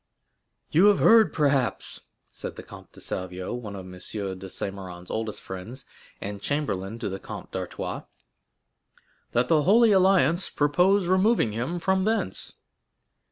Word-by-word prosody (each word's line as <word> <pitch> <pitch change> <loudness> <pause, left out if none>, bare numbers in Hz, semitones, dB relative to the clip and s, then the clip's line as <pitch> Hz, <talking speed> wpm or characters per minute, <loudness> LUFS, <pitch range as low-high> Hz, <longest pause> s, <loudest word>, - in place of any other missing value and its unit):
"You 180 +6 +6
have 205 -2 +5
heard, 225 -1 +6
perhaps," 140 -5 0 0.3
said - - -7
the - - -9
Comte - - -13
de - - -15
Salvieux, 90 +1 -4
one 110 -5 -6
of 95 -1 -8
M. 95 - -10
de 90 - -11 0.5
Saint 95 +1 -4
Méran's 90 -2 -9
oldest 110 -1 -3
friends, 95 +8 -8 0.3
and 100 0 -6
chamberlain 115 -9 -2
to 115 - -4
the 95 0 -4
Comte - - -9
d'Artois, - - -4 1.3
"that 120 +1 +2
the 155 0 +4
Holy 220 +7 +5
Alliance 190 -2 +4
purpose 180 +7 +3
removing 185 - +3
him 125 +11 -3
from 190 +2 +1
thence?" 220 - -2
135 Hz, 145 wpm, -26 LUFS, -, 1.3 s, You